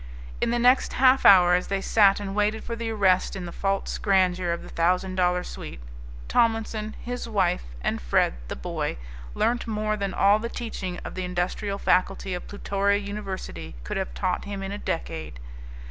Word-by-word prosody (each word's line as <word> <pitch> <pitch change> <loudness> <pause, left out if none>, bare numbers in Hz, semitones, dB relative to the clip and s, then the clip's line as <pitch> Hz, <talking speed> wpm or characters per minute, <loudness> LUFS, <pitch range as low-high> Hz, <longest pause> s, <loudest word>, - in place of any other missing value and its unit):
In - - +2
the 240 - +1
next 250 +2 +4
half 260 +1 +5
hour 180 -3 +8
as 180 0 +1
they 195 0 -1
sat 200 0 +4
and 195 -1 -5
waited 210 +2 0
for 230 - -4
the 230 0 -4
arrest 195 -5 +2
in 185 -2 -5
the 170 - -6
false 195 +1 -2
grandeur 185 -3 +2
of 170 - -3
the - - -11
thousand 180 +3 +1
dollar 180 -1 +1
suite 65 - -8 0.5
Tomlinson, 225 -2 0
his 245 -1 -5
wife, 185 - +1 0.2
and - - -1
Fred - - +2
the - - -4
boy 60 - -3 0.4
learnt 240 +1 0
more 215 -1 -1
than 200 -2 -3
all 200 +2 +4
the 235 +1 -4
teaching 190 -7 -5
of - - -6
the 185 - -4
industrial 180 +3 -2
faculty 185 0 +1
of 180 - -5
Plutoria 200 0 0
University 195 - -6
could 65 - -4
have 60 - -3
taught 60 - -1
him 200 -1 -5
in 195 - -4
a 205 - -5
decade. 160 - -4
195 Hz, 185 wpm, -25 LUFS, 180-215 Hz, 0.5 s, hour